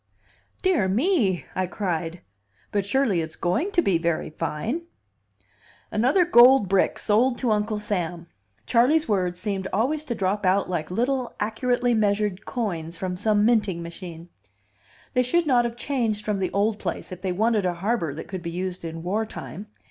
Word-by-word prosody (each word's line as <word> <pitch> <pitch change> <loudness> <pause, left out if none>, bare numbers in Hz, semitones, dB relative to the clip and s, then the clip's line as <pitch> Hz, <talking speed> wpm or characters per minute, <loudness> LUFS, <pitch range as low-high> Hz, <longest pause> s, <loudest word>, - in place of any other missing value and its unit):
"Dear 360 - +3
me!" 220 - +1
I 185 -1 -1
cried. 175 -3 -3 0.5
"But 200 -1 -1
surely 220 -7 +2
it's 160 0 -6
going 185 - 0
to 345 - +3
be 180 -4 +2
very 165 -1 -1
fine!" 230 - -3 1.0
"Another 260 - +3
gold 255 - +7
brick 195 +1 +2
sold 240 +4 +2
to 245 -4 0
Uncle 210 0 0
Sam." 175 -5 -3 0.4
Charley's 270 +7 +3
words 180 -4 0
seemed 195 -1 -2
always 270 +10 0
to 240 - -3
drop 200 0 -1
out 190 +1 +2
like 170 -4 -3
little 250 +6 -1
accurately 245 +3 +1
measured 210 -2 0
coins 170 -9 -3
from 185 0 -3
some 210 +2 +2
minting 210 -7 +2
machine. 170 0 -9 0.8
"They 250 - +3
should 330 +8 +1
not 245 -4 +3
have 235 -1 -3
changed 235 -5 -1
from 210 -2 -1
the 185 - 0
old 205 +1 0
place 175 0 -4
if 185 0 -8
they 190 -1 -1
wanted 215 +3 +1
a 175 - -1
harbor 190 -3 -1
that 160 - -7
could 185 -2 -5
be 170 - -4
used 180 +1 -4
in 165 0 -6
war 205 +5 0
time. 210 -1 -8
205 Hz, 170 wpm, -25 LUFS, 180-240 Hz, 1.0 s, gold